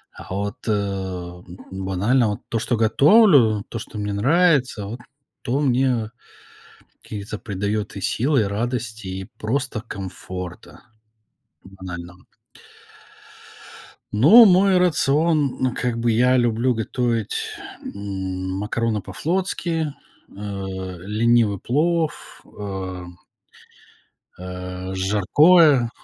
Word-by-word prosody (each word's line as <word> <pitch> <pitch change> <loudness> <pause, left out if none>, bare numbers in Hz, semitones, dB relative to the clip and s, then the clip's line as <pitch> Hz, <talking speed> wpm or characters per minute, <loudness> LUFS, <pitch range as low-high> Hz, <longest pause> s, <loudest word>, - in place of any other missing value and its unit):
А - - -11
вот, 100 +1 -3
э, - - +2
м, 95 -3 -4
банально 95 +6 +1
вот 105 - -4
то, 115 - -1
что 120 +1 -1
готовлю, 120 - +5
то, 115 - -5
что 110 - -9
мне 105 -1 -3
нравится, 135 - +2
вот 115 +5 -7 0.4
то 130 +4 -1
мне 125 -5 +1 0.9
каких-то 105 0 -7
придаёт 100 0 -3
и - - -5
сил, 135 +9 0
и 120 - +4
радости, 110 +1 -3
и 95 +1 -5
просто 125 0 -2
комфорта. 95 -4 -8 0.8
Банально. 90 -2 -10 1.9
Ну, 165 - +8
мой 190 0 +5
рацион, 155 -4 +2
ну, 130 -1 0
как 120 -2 -1
бы, 115 0 +1
я 125 +3 +3
люблю 120 +1 +2
готовить, 115 -1 -1 0.5
м, 95 -2 -5
макароны 110 +1 -1
по-флотски, 165 - -2 0.4
э, - - -21 0.7
ленивый 110 0 +2
плов, 160 +4 -1 0.2
ам 95 -3 -6 1.2
э, 90 +1 -7
жаркое. 120 - +4
110 Hz, 100 wpm, -22 LUFS, 95-130 Hz, 1.9 s, Ну